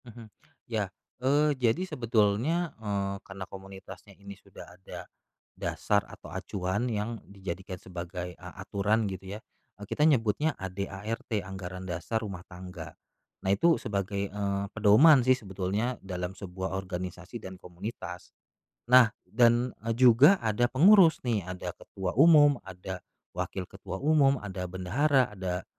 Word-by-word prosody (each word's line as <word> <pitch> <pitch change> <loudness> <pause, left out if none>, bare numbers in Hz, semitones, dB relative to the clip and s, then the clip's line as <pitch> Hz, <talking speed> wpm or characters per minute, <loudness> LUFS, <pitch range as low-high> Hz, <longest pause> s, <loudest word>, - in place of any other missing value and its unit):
Mhm, 115 -1 -11 0.4
ya, - - -2 0.3
eee, 145 +3 +3
jadi 125 +5 +1
sebetulnya, 120 - +1
eee, 100 -2 -2
karena 95 -1 -8
komunitasnya 95 -2 -12
ini 100 +1 -10
sudah 100 -1 -13
ada, 95 - -9 0.5
dasar 100 -1 0
atau - - -12
acuan 95 +4 -2
yang 110 0 -3
dijadikan 95 -1 -6
sebagai 90 0 -7
a 90 +2 -11
aturan 105 +3 +1
gitu 95 +1 -7
ya, - - -12 0.4
eee, - - -6
kita 150 - +2
nyebutnya 140 +1 +2
AD/ART 100 +4 -5
anggaran 95 -1 -7
dasar 90 +6 -2
rumah 100 -5 -7
tangga, 90 -4 -9 0.5
nah 95 - -2
itu 165 +12 +4
sebagai, 100 -1 -2
eee, 100 -1 -2
pedoman 115 +8 +6
sih 130 - +6
sebetulnya 100 +3 -2
dalam 90 0 -5
sebuah 95 -1 -5
organisasi 90 +3 -6
dan 95 -2 -9
komunitas, 90 0 -8 0.6
nah 125 -1 +7 0.2
dan, 120 +1 +3
eee, 115 - 0
juga 130 - +7
ada 110 +2 +2
pengurus 175 - +6
nih 115 -4 +1
ada 90 0 -5
ketua 95 -2 -5
umum 145 -4 +7
ada, 95 -1 -7 0.4
wakil 95 - -3
ketua 95 0 -8
umum, 140 -2 +4
ada 95 -2 -5
bendahara 120 +9 +1
ada, 95 -2 -4
100 Hz, 135 wpm, -29 LUFS, 95-120 Hz, 0.6 s, nah